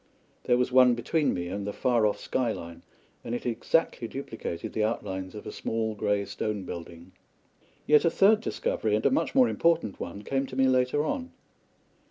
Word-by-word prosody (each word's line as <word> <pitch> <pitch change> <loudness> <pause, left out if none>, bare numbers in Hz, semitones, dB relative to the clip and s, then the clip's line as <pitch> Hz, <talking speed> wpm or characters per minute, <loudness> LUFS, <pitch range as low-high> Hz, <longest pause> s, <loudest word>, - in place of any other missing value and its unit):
There 120 - +3
was 125 0 0
one 125 -1 +6
between 145 +6 0
me 90 -1 -3
and 100 +2 -4
the - - -1
far 120 -2 +2
off 105 - -2
sky 125 -3 -1
line, 85 -3 -8 0.4
and 120 - -3
it - - -6
exactly 120 +1 0
duplicated 115 -10 -6
the 110 - 0
outlines 95 -3 -3
of 105 - -8
a - - -5
small 110 -1 -2
grey 105 -1 0
stone 105 0 -3
building. 85 0 -9 0.7
Yet 150 0 +5
a 170 - +4
third 210 +5 +4
discovery, - - -1
and - - -1
a - - +4
much - - 0
more 255 -2 +6
important 165 - +1
one, 100 +4 -6
came 135 +3 -1
to 130 - -9
me 135 0 +3
later 130 +3 +2
on. 260 - -3
120 Hz, 190 wpm, -27 LUFS, 100-140 Hz, 0.7 s, one